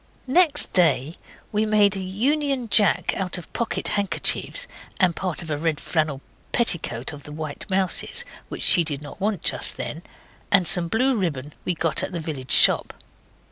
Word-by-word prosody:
Next 295 +2 +3
day 160 -3 +2 0.4
we 210 0 0
made 210 -2 +3
a - - -2
Union 255 +6 -1
Jack 205 -1 +2
out 185 -1 -3
of 175 - -11
pocket 235 - -1
handkerchiefs 205 - 0 0.3
and 180 -3 +2
part 180 -3 -3
of 160 - -7
a 145 - -2
red 160 -2 -1
flannel 155 -4 -2 0.3
petticoat 160 - -1
of 145 - -10
the 150 - -12
White 155 +2 -7
Mouse's, 190 -1 +2 0.2
which - - -4
she 175 - +6
did 150 -2 -2
not 150 - -11
want 205 -3 -2
just - - +1
then, 160 - -5 0.5
and 190 -4 +3
some 180 -3 +4
blue 250 +7 +1
ribbon 150 - -3
we 180 - 0
got 165 +1 +1
at 190 - -4
the 170 - -3
village 145 -5 -7
shop. - - +4
180 Hz, 175 wpm, -23 LUFS, 155-210 Hz, 0.5 s, she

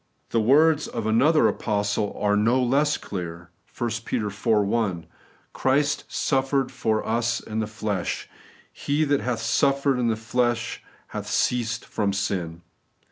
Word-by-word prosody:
The 115 - +2
words 150 +6 +4
of 115 -2 -4
another 135 +9 +4
apostle 105 -1 -1
are 105 0 +2
no 115 +5 +3
less 140 +4 +2
clear 85 -2 -7 0.3
(1 120 -1 -1
Pet. - - -9
iv. 105 +2 -6
1): 105 -5 +1 0.2
' - - -34
Christ 145 +2 +1
suffered 135 -1 0
for 110 -1 -1
us 120 +1 0
in 110 0 -5
the 110 - -1
flesh;... 105 -4 -3 0.5
he 145 +2 0
that 145 -2 +1
hath 120 -3 -2
suffered 140 +3 +2
in 120 - +1
the 115 - +2
flesh 120 +1 -1 0.3
hath - - -6
ceased 115 -1 0
from 100 -2 -1
sin.' 85 -4 -3
115 Hz, 145 wpm, -24 LUFS, 105-135 Hz, 0.5 s, words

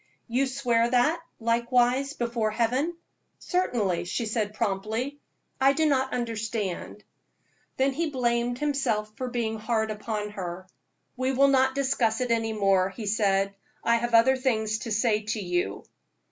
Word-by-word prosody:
"You 255 +3 +1
swear 240 -3 +1
that, 255 +7 +2 0.2
likewise, 245 +4 +2
before 235 -4 -1
Heaven?" 250 +9 0 0.4
"Certainly," 210 - 0
she 230 +6 -2
said, 215 -1 -2
promptly. 220 +6 -2 0.4
"I 270 +1 +6
do 315 +2 +1
not 265 -3 +2
understand." 220 -4 -3 0.7
Then 270 +1 +2
he 325 +3 -1
blamed 240 -2 0
himself 270 -7 -1
for 255 -2 -4
being 230 -3 -2
hard 220 0 0
upon 210 -1 -4
her. 185 -2 -6 0.5
"We 260 +1 0
will 275 +2 +5
not 265 -1 +3
discuss 260 -5 +1
it 250 -2 -1
any 225 -1 +1
more," 195 -3 +2
he 215 +3 -7
said, 200 -2 +1 0.3
"I 235 0 +4
have 240 0 0
other 260 +4 +6
things 220 -4 0
to 230 - -6
say 215 0 +2
to 220 +1 -3
you." 175 - -2
235 Hz, 145 wpm, -27 LUFS, 215-260 Hz, 0.7 s, I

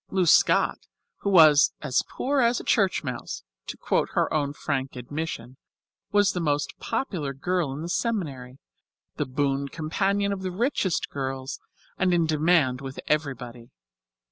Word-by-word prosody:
Lou 190 -2 +1
Scott, 165 - +4 0.4
who 200 - -2
was 155 -6 +7
"as 135 -4 +1
poor 275 +1 0
as 235 0 +3
a - - -8
church 195 -6 +2
mouse," 120 - -5 0.2
to - - -6
quote - - 0
her - - +1
own 145 -2 0
frank 135 -2 -3
admission, 130 -1 -5 0.5
was 205 -1 +4
the 180 - -3
most 145 -3 0
popular 155 - -3
girl 175 0 -1
in 145 +4 -5
the - - -4
seminary, 150 - -2 0.6
the 150 - -1
boon 140 +1 -1
companion 195 +7 0
of 195 - -5
the 185 - -2
richest 195 - -1
girls, 135 0 -4 0.4
and 180 -1 +3
in 170 -1 +3
demand 155 -4 +2
with 135 -1 -7
everybody. 125 -6 -3
155 Hz, 150 wpm, -26 LUFS, 135-185 Hz, 0.6 s, was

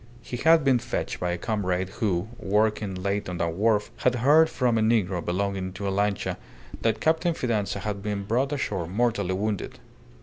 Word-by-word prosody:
He 125 - -5
had 160 +3 +5
been 135 -3 +4
fetched - - -3
by 90 - -1
a 90 - -2
comrade 95 -3 -1
who, 95 -2 -1
working 105 -1 +1
late 100 +2 -2
on 90 - -4
the 85 - 0
wharf, 105 +5 +1
had 125 -1 +2
heard 150 +7 +5
from 120 -3 +1
a - - +1
negro 100 -6 +1
belonging 95 0 -2
to 100 +1 -4
a - - 0
lancha, 100 -1 0 0.4
that 115 -1 +1
Captain 160 +2 +1
Fidanza 110 -8 -1
had 100 -1 -3
been 100 -1 -3
brought 125 +7 0
ashore 100 - -2
mortally 100 -2 0
wounded. 105 0 -3
105 Hz, 180 wpm, -26 LUFS, 95-120 Hz, 0.4 s, had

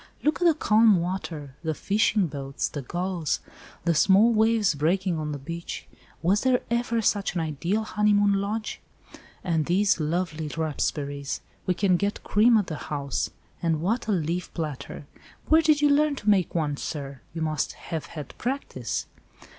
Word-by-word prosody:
"Look 305 +3 +1
at - - +3
the 325 - +5
calm 215 - +5
water—the 160 -4 -4
fishing 205 +1 +2
boats, 140 -3 -3
the 145 - -5
gulls, 175 +2 -2 0.5
the 170 - +3
small 200 +8 +5
waves 220 -3 +3
breaking 170 +4 0
on 150 -1 -3
the 145 - -3
beach! 170 +5 -6 0.4
Was 195 +5 +3
there 255 -1 +3
ever 235 -1 0
such 200 -2 +1
an 170 - +1
ideal 170 +7 -1
honeymoon 205 -1 +3
lodge? 205 +3 -2 0.6
And 160 -4 0
these 190 +1 +3
lovely 160 0 -1
raspberries. 145 -2 -2 0.3
We 180 - +2
can 185 -1 +3
get 200 +2 -2
cream 225 +3 +5
at 205 - +1
the 155 - -5
house. 140 -3 -2 0.3
And 165 -2 +1
what 215 +8 -1
a - - +1
leaf 175 -1 -1
platter! 150 -3 -5 0.4
Where 320 +1 +6
did 305 -2 +3
you 290 - +6
learn 295 0 +3
to 215 -5 -2
make 185 -5 +1
one, 150 -4 0
sir? 140 -3 -5
you 165 - -2
must 155 -2 -1
have 160 -4 -6
had 150 -5 -8
practice." 270 +4 -3
180 Hz, 160 wpm, -26 LUFS, 155-210 Hz, 0.6 s, Where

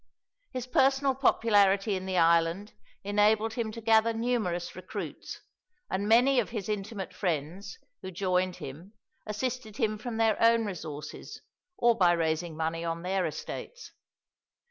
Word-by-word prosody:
His 255 -2 -4
personal 270 +1 +3
popularity 205 -6 +3
in 185 0 -5
the 185 -1 -1
island 170 +4 +2 0.3
enabled 210 +2 +2
him 225 -2 -2
to 230 - -7
gather 225 +1 +4
numerous 225 -7 -2
recruits, 185 0 -7 0.5
and 195 +2 -1
many 250 +4 +5
of 230 - -1
his 210 -5 -5
intimate 205 -1 -4
friends, 175 - -3 0.2
who - - -6
joined 185 0 0
him, 160 +10 -9 0.3
assisted 225 0 -4
him 215 -4 0
from 225 0 -5
their 225 -2 +2
own 230 0 +4
resources 155 -7 -7 0.4
or 235 -1 +4
by 180 -4 +4
raising 160 0 -1
money 165 +1 -2
on 165 0 -3
their 185 0 0
estates. - - -7
205 Hz, 140 wpm, -29 LUFS, 180-230 Hz, 0.5 s, many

